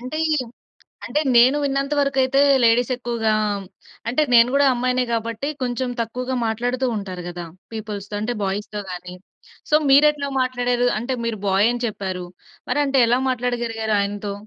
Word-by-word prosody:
అంటే 255 +5 -6 0.2
ఈ - - +3 0.7
అంటే 300 - 0 0.2
నేను 255 +4 +6
విన్నంత 275 +1 -1
వరకు 275 -1 0
అయితే 270 +1 +1 0.2
లేడీస్ 235 +2 +3
ఎక్కువగా 235 -3 -1 0.8
అంటే 255 +6 +1
నేను 235 0 +7
కూడా 285 0 +4
అమ్మాయినే 250 +1 0
కాబట్టి 230 +3 -3 0.2
కొంచెం 250 0 -2
తక్కువగా 250 +3 -3
మాట్లాడుతూ 245 +4 -1
ఉంటారు 185 -3 -6
కదా, 175 -1 -7 0.3
పీపుల్స్‌తో 210 -2 -6
అంటే 230 +3 -1
బాయ్స్‌తో 205 +2 -3
గాని. 180 0 -8 0.5
సో 300 - +4
మీరు 285 +2 +7
ఎట్లా 285 -1 -5
మాట్లాడారు? 245 -1 0
అంటే 250 +3 -2
మీరు 225 -3 -3
బాయ్ 195 +3 +3
అని 245 0 -4
చెప్పారు, 190 -4 -5 0.4
మరి 290 - +1
అంటే 275 -1 0
ఎలా 240 +2 +3
మాట్లాడగలిగారు 235 -3 -1
ఆయనతో? 200 0 -3
240 Hz, 155 wpm, -21 LUFS, 215-255 Hz, 0.8 s, నేను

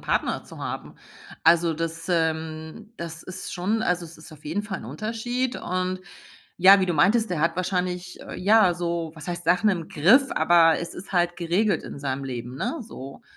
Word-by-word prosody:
Partner - - -1
zu - - -12
haben. - - -6 0.5
Also, 165 0 +5
das, 165 +1 -4
ähm 160 +4 -2
das 165 -1 -7
ist 185 0 -7
schon 205 +5 -1
also, 180 -3 0
es 165 - -13
ist 155 +1 -12
auf 150 -1 -15
jeden 175 +8 -2
Fall 200 -3 -5
'n - - -10
Unterschied 230 - -3
und 185 +1 -2 0.6
ja, 195 +2 +8
wie 185 - +1
du 175 - 0
meintest, 205 +8 +3
der 165 -4 -1
hat 165 +2 +1
wahrscheinlich, 180 -1 -2
äh, - - -9
ja, 200 -2 +5
so 170 -2 -2
was 155 -2 -10
heißt 175 0 -4
Sachen 180 +5 +3
im 170 -4 -3
Griff, 225 - +5
aber 165 0 +5
es 170 - -5
ist 190 +2 -9
halt 175 -1 +1
geregelt 185 +5 +1
in - - -8
seinem 140 -1 -3
Leben, 125 0 -6
ne, 330 - -2
so. 135 - -10
175 Hz, 195 wpm, -25 LUFS, 160-190 Hz, 0.6 s, ja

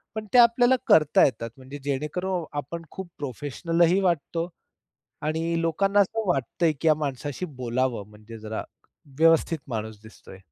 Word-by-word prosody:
पण 220 0 -4
ते 250 - +6
आपल्याला 245 +2 +6
करता 150 -2 +5
येतात. 115 -3 -2
म्हणजे 135 +2 -10
जेणेकरून 155 +6 -2
आपण 165 +4 -5
खूप 190 -2 -7
प्रोफेशनलही 165 - 0
वाटतो 170 -1 0 0.8
आणि 165 +2 -1
लोकांना 195 +5 +2
असं 215 +1 0
वाटतंय 160 +2 +1
की 165 - +3
या 155 - +6
माणसाशी 145 +5 -4 0.2
बोलावं, 120 -3 -1
म्हणजे 110 +2 -12
जरा 110 0 -5 0.6
व्यवस्थित 165 0 +4
माणूस 110 -2 -5
दिसतोय. 110 -3 -14
155 Hz, 135 wpm, -25 LUFS, 130-175 Hz, 0.8 s, ते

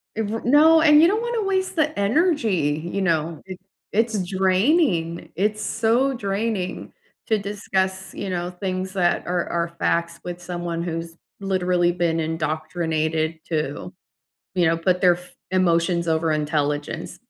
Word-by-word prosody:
Ev 220 +1 -3
no, 315 +5 +6
and 300 -1 +7
you 335 - +7
don't 425 +4 +1
wanna 475 -2 -1
waste 380 -1 0
the 310 -1 0
energy, 205 - +1
you 200 - -1
know? 165 -3 0
It 185 0 -8 0.3
it's 220 -2 +1
draining, 190 - +1
it's 210 +3 0
so 235 +6 +1
draining 200 -3 -3 0.3
to 220 -2 +2
discuss, 190 -2 -2
you 195 - -5
know, 175 -1 -2
things 185 0 -4
that 175 -2 +1
are 175 -1 -1
are 170 0 -1
facts 170 0 0
with 175 0 -6
someone 175 -1 -4
who's 165 -1 -5 0.2
literally 180 -3 +1
been 170 -2 0
indoctrinated 160 0 -1
to, 155 +2 -3 0.6
you 175 -2 +2
know, 165 +1 +3
put 180 +2 +1
their 180 -1 +5
f 180 0 -16 0.2
emotions 170 -1 +2
over 160 0 +1
intelligence. 150 -1 -2
185 Hz, 140 wpm, -23 LUFS, 165-215 Hz, 0.6 s, and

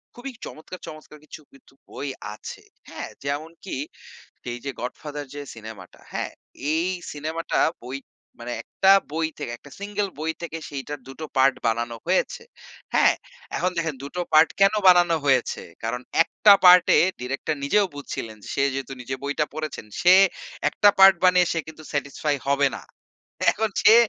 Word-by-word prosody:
খুবই 260 +2 -7
চমৎকার, 170 +4 -9
চমৎকার 155 -1 -11
কিছু 155 - -11
কিন্তু 135 - -21 0.2
বই 145 - -6 0.3
আছে। 105 - -9 0.3
হ্যাঁ, - - -6
যেমনকি 155 +6 -5 0.8
এই 120 - -4
যে, - - -2
'গডফাদার' 145 +3 -6
যে, 145 - -5
সিনেমাটা 110 -5 -11
হ্যাঁ, - - -3 0.4
এই 165 +3 +1 0.2
সিনেমাটা 155 +3 -2 0.2
বই 130 +2 -5 0.4
মানে 120 +1 -5
একটা 190 0 +3 0.2
বই 160 +1 0
থেকে - - -5
মানে 120 - -6
একটা 145 - -16
সিঙ্গল 205 0 -2
বই 160 +1 -1
থেকে 165 -1 -5
সেইটার 145 +1 -6
২ 135 - -8
টো 155 - -4
পার্ট 130 0 +5
বানানো 115 +1 -1
হয়েছে। 185 - 0 0.5
হ্যাঁ, - - +5 0.4
এখন 180 - 0
দেখেন 160 -3 -1
২ - - -5
টো 180 - 0
পার্ট 155 +1 +7
কেন 195 +1 +6
বানানো 175 -2 +6
হয়েছে? 130 -3 +2 0.2
কারণ 120 +2 -2 0.2
একটা 205 +4 +6
পার্ট 180 0 +9
এ - - +6 0.2
ডিরেক্টর 135 +4 -2
নিজেও 205 +8 +3
বুঝছিলেন 115 -6 -6 0.2
সে 140 - +1
যেহেতু 135 -1 -4
নিজে 130 +2 -4
বইটা 145 +2 0
পড়েছেন 155 -7 -5 0.2
সে 180 +1 +7 0.5
একটা 205 - +5
পার্ট 195 0 +9
বানিয়ে 180 -1 +5
সে 165 - -1
কিন্তু 155 0 -11
satisfy 145 +1 -1
হবে 140 0 +3
না। - - -11 0.7
এখন 220 0 -1
সে 220 - +8
150 Hz, 160 wpm, -24 LUFS, 135-180 Hz, 0.8 s, পার্ট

